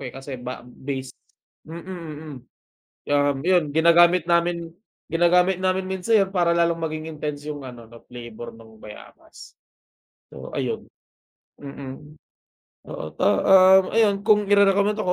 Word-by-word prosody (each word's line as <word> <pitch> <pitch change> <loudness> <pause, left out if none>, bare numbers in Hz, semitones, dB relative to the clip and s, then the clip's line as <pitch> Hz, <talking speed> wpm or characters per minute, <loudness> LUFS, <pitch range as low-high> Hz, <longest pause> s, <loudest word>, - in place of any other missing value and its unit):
eh, 125 - -11
kasi 135 -1 -8
ba 125 0 -8
base 130 +1 -7 0.6
mm, 165 +1 -8
mm. 160 -5 -8 0.7
Kaya 145 - +1 0.2
nga 135 - -7
yun, 180 -3 +3
ginagamit 170 +1 +5
namin 170 -1 0 0.4
ginagamit 175 +2 +2
namin 185 0 -1
minsan 200 +3 +1
yan 195 - -3
para 175 -3 +1
lalong 170 -1 +1
maging 155 0 -5
intense 150 -1 -6
yung 145 -1 -5
ano 120 -2 -11
'no, 115 0 -15
flavor 120 -1 -10
no'ng 110 -1 -17
bayabas. 105 - -14 0.8
So - - -10
ayun. - - -3 0.7
Mm. 140 +1 -10 0.8
Oo, - - -7
to - - -1
um, 190 0 +5
ayan, 210 -3 +2
kung 210 -1 +3
irerekomenda 200 +1 +3
ko, 180 - +1
170 Hz, 140 wpm, -23 LUFS, 140-185 Hz, 0.8 s, ginagamit